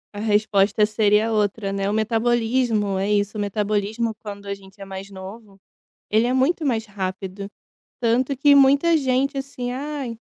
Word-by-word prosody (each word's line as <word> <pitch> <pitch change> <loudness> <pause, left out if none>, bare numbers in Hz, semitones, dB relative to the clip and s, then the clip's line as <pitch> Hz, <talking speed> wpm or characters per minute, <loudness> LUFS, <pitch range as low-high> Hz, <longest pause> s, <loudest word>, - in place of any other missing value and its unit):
A - - -5
resposta 210 -1 +2
seria 215 +1 +2
outra, 205 -1 0
né, 195 0 -1
o - - -1
metabolismo 225 -2 +1
é 200 +2 -1
isso, 205 +1 0
o 210 - -2
metabolismo 210 +2 -1
quando 200 -1 -8
a 200 - -3
gente 195 0 -14
é 195 - -8
mais 195 +1 -8
novo 195 +1 -11 0.5
ele 220 +2 +3
é 250 - 0
muito 300 +5 +1
mais 230 -5 0
rápido, 195 0 -5 0.6
tanto 250 +4 +1
que 285 +2 +5
muita 280 +4 +5
gente, 270 +1 0
assim, 255 -2 -5
"Ai, 270 -4 -5
215 Hz, 165 wpm, -22 LUFS, 200-250 Hz, 0.6 s, que